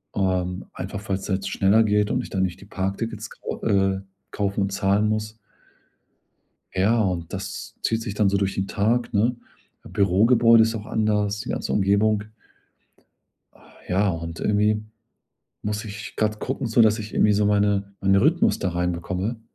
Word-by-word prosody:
ähm, 90 -2 -1
einfach, 100 +3 -6
weil's 95 +1 -2
halt 95 +1 -1
schneller 105 +3 +3
geht 105 -1 +1
und - - +1
ich - - -9
dann 95 -1 0
nicht 90 -2 -3
die - - -12
Parktickets 105 +3 -4
kau - - -7
äh, 95 -1 +2 0.3
kaufen 100 0 -1
und 100 0 0
zahlen 100 +2 +2
muss. 110 +1 -3 1.4
Ja, 105 +5 +2
und 90 -4 -2
das - - -6
zieht 115 0 0
sich 105 -3 -4
dann 105 -2 +2
so 100 - +1
durch 95 -1 0
den 95 +1 -2
Tag, 115 +4 0
ne? 115 +4 +2 0.5
Bürogebäude 115 +4 +4
ist 115 +1 0
auch 105 -1 -6
anders, 105 -1 0
die - - -6
ganze - - -2
Umgebung. 105 +1 +2 1.3
Ah - - -21
ja, 100 +2 +2
und 85 -1 -5
irgendwie 105 +1 +1 0.8
muss 105 +1 -3
ich 105 +1 -8
gerade 110 0 0
gucken, 130 -1 -3
so 115 +1 +4
dass 110 +1 +4
ich 105 0 -7
irgendwie 105 0 +3
meine 100 -1 +1
meinen 95 0 +3
Rhythmus 155 - +3
da 95 - -1
reinbekomme. 90 +5 -2
105 Hz, 165 wpm, -24 LUFS, 95-110 Hz, 1.4 s, Bürogebäude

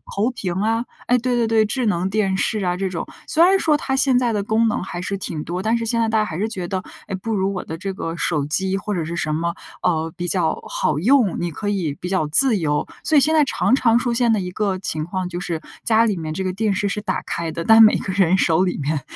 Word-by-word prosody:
投 210 +5 +1
屏 195 -8 -4
啊 225 +2 0 0.2
哎， 250 - +4
对， 250 +1 -1
对， 235 -1 +1
对， 220 -1 +3
智 245 +4 -1
能 190 -3 0
电 195 -2 0
视 215 +3 0
啊 180 0 0
这 190 +1 -2
种， 175 -2 -5 0.2
虽 320 - +1
然 380 +2 +5
说 305 -4 +2
它 265 -2 -2
现 265 -2 +4
在 240 -2 0
的 205 -1 -1
功 220 +2 +1
能 215 - -1
还 175 -1 -6
是 195 +2 -3
挺 165 -5 -4
多， 175 +2 -3
但 225 +2 +1
是 230 - -3
现 230 +1 +1
在 225 - +1
大 220 0 +2
家 215 - +1
还 160 - -5
是 210 +4 -1
觉 185 -5 -5
得， 185 0 -3 0.2
哎， 195 - -3
不 220 +4 -4
如 195 0 0
我 180 - -4
的 160 - -7
这 195 +3 -4
个 165 -3 -5
手 150 -4 0
机 190 +6 0
或 205 +1 -4
者 170 -4 -2
是 170 +2 -5
什 155 -3 -2
么， 170 +2 -2 0.3
呃， 165 -2 0
比 175 -1 -3
较 170 -3 +1
好 150 -1 -1
用， 230 - +3
你 175 -1 -2
可 205 +6 -4
以 180 -8 -1
比 180 - -4
较 185 -5 0
自 230 - +6
由。 150 -4 -1 0.2
所 310 - +3
以 - - +6
现 310 +4 +3
在 305 -2 +4
常 265 - 0
常 235 -4 +3
出 240 0 -1
现 235 -1 +2
的 215 - +1
一 180 0 -5
个 200 0 -1
情 155 -4 -3
况 185 +1 -4
就 175 0 -5
是， 170 -3 -4 0.2
家 225 0 +4
里 210 -4 0
面 155 -2 -4
这 190 +4 -3
个 185 - -1
电 205 +2 -1
视 200 +1 -1
是 200 - -2
打 210 - -2
开 165 -1 -3
的， 170 - -4
但 225 +4 +7
每 215 -1 +7
个 195 - -4
人 190 -1 +3
手 170 -1 +3
里 180 - -2
面 145 +1 -2
195 Hz, 300 characters per minute, -21 LUFS, 175-225 Hz, 0.3 s, 但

